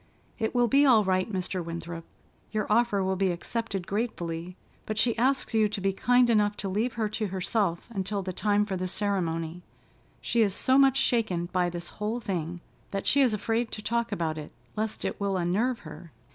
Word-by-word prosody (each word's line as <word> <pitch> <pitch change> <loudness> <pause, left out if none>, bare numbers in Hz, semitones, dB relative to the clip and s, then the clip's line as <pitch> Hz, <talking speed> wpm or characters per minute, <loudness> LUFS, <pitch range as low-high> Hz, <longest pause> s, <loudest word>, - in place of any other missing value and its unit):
"It 220 +2 -1
will 245 -1 +4
be 275 +5 +5
all 240 -6 +6
right, 185 +2 +1
Mr. 185 -1 -2
Winthrop. 170 0 -6 0.5
Your 215 -1 -1
offer 215 -3 +3
will 190 0 0
be 190 0 +1
accepted 195 +2 -3
gratefully, 180 -5 -3 0.3
but 215 - -3
she 230 +1 +2
asks 260 +1 +1
you 215 -1 +3
to 205 - -3
be 195 0 0
kind 245 +5 +4
enough 210 -3 +2
to 195 - -3
leave 220 +6 0
her 225 -3 -1
to 215 0 -2
herself 190 -1 -1
until 195 -1 -2
the 185 0 -4
time 205 +2 +2
for 195 -2 -3
the 185 0 -2
ceremony. 175 -4 -1 0.6
She 235 - +1
is 200 -3 +2
so 260 +1 +3
much 270 -1 +5
shaken 215 -11 +1
by 180 -1 +2
this 175 0 -5
whole 220 +3 -1
thing 175 -6 -3 0.3
that 195 0 -3
she 280 - +4
is 245 -5 +4
afraid 225 +2 -1
to 215 - -4
talk 235 +1 0
about 160 -2 -1
it, 150 - -8 0.2
lest 215 0 -3
it - - -3
will 200 -1 0
unnerve 210 +8 0
her. 155 +1 -11
200 Hz, 200 wpm, -28 LUFS, 180-225 Hz, 0.6 s, all